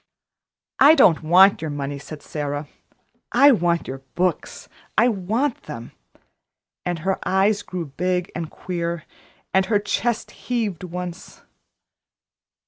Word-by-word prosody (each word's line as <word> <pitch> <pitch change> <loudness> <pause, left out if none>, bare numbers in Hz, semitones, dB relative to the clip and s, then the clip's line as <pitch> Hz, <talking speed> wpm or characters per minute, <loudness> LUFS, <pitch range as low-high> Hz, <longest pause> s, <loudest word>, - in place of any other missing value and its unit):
"I 295 +4 +8
don't 165 - +5
want 180 +4 +5
your 160 - -3
money," 140 -1 -4
said 150 +1 -10
Sara. 145 0 -4 0.6
"I 280 +4 +7
want 175 -7 +1
your 135 +1 -5 0.2
books 180 0 -2 0.3
I - - +6
want 230 +5 -1
them." 120 -6 -7 0.9
And 175 -1 -2
her 190 0 0
eyes 200 +2 +2
grew 180 -4 -5
big 180 +5 -2
and 165 -3 -4
queer, 170 -2 -4 0.5
and 190 0 +3
her 215 - +3
chest 220 +3 -1
heaved 220 -9 -3
once. 180 0 -7
180 Hz, 125 wpm, -22 LUFS, 160-205 Hz, 0.9 s, I